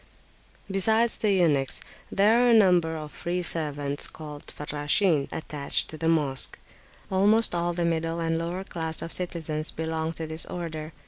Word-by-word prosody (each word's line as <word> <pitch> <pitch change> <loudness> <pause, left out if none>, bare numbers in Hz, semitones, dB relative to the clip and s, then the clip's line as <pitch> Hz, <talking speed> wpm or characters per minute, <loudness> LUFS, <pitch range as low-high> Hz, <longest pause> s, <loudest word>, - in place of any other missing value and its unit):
Besides 220 +4 +2
the 215 - 0
eunuchs, 155 -8 +1 0.3
there 215 +4 +3
are 245 - +3
a 235 - +5
number 175 -6 +3
of 150 -1 -8
free 175 +1 -4
servants, 145 -4 -1
called 150 -2 -11
Farrashin, 150 +2 -1
attached 150 -3 +2
to 155 - -8
the 165 - 0
Mosque; 145 -6 0 0.5
almost 205 +4 +3
all 175 0 -1
the 170 0 -2
middle 165 0 -2
and 165 0 -1
lower 175 +3 -4
class 160 -4 -3
of 165 - -7
citizens 160 -3 +3
belong 160 0 -4
to 160 - -6
this 160 +1 +4
order. 160 -3 -6
165 Hz, 155 wpm, -25 LUFS, 155-180 Hz, 0.5 s, a